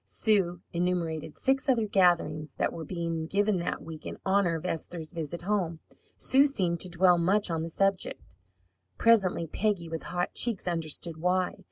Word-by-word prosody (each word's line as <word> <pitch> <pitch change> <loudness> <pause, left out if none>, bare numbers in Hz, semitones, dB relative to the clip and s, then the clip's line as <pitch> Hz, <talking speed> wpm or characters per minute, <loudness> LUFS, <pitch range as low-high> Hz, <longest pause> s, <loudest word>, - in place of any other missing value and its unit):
Sue 185 -5 +1
enumerated 170 -3 -1
six 270 +1 0
other 235 -4 +3
gatherings 170 -7 +2
that - - 0
were 165 - -6
being 165 -1 -3
given 200 +1 +1
that 170 - -3
week 160 -2 -9
in - - -6
honour 190 -3 +2
of 160 - -5
Esther's 165 -2 -4
visit 170 0 -5
home. 180 -5 -1 0.4
Sue 275 +2 +5
seemed 180 -11 -1
to 185 - -3
dwell 175 0 +4
much 190 +2 +2
on 165 -1 -1
the 165 - -4
subject. 195 - -1 0.6
Presently 195 -7 +3
Peggy, 185 +1 -1
with 165 0 -4
hot 175 0 -2
cheeks, 225 -6 -2
understood 165 -1 -2
why. 180 +2 +1
175 Hz, 165 wpm, -29 LUFS, 165-195 Hz, 0.6 s, Sue